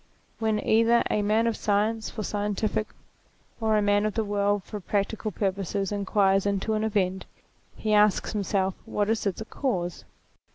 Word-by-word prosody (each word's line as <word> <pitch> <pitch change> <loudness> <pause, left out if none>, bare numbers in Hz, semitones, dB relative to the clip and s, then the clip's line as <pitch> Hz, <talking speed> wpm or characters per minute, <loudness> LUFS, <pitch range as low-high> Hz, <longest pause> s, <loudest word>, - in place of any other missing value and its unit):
When 220 -1 +1
either 230 +2 +4
a 210 - +2
man 215 +2 +2
of 230 -1 +1
science 215 +2 0
for 215 - -5
scientific 210 +1 -1 0.7
or 220 -1 +2
a 210 - +2
man 205 0 +3
of 215 - -4
the 225 - +1
world 205 -1 0
for 210 - -7
practical 205 +3 -2
purposes 195 0 -2
inquires 200 -1 +2
into 200 +2 0
an 215 0 0
event, 190 -3 0 0.5
he 215 -1 -1
asks 210 -2 +3
himself 195 -2 0
what 205 +1 0
is 225 -2 0
its 200 +3 -2
cause? 180 -10 -2
205 Hz, 160 wpm, -26 LUFS, 200-220 Hz, 0.7 s, either